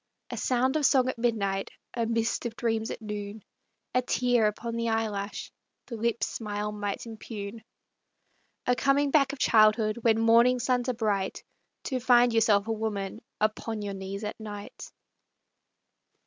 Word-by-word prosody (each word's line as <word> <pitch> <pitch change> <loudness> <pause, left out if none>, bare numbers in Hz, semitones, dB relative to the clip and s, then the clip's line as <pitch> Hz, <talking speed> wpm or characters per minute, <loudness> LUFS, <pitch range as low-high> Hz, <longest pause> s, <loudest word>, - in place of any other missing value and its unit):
A - - -4
sound 260 +3 +1
of 300 - +1
song 260 -2 +3
at 260 - -3
midnight, 200 -5 0 0.2
A 230 -2 -1
mist 230 +1 0
of 225 - -8
dreams 225 -1 -1
at 225 - -6
noon; 210 0 -6 0.5
A 250 - +3
tear 245 -3 +2
upon 230 +2 -3
the 230 0 -1
eyelash, 215 -2 -2 0.3
The 240 - -7
lips' 230 +1 0
smile 210 -1 -4
might 205 0 -4
impugn. 220 -1 -7 1.0
A 250 - +3
coming 280 +2 +2
back 275 -2 +4
of 285 - -7
childhood 215 -1 +4
When 225 -1 +3
morning 235 +2 +5
suns 250 0 0
are 250 - -1
bright, 205 -4 -1 0.4
To 260 -3 -2
find 245 -1 +5
yourself 215 -2 +3
a - - -1
woman 215 -1 -3 0.2
Upon 215 0 -1
your 200 -1 -3
knees 195 +1 -6
at 210 +2 -5
night. 205 -2 -8
225 Hz, 155 wpm, -28 LUFS, 210-245 Hz, 1.0 s, morning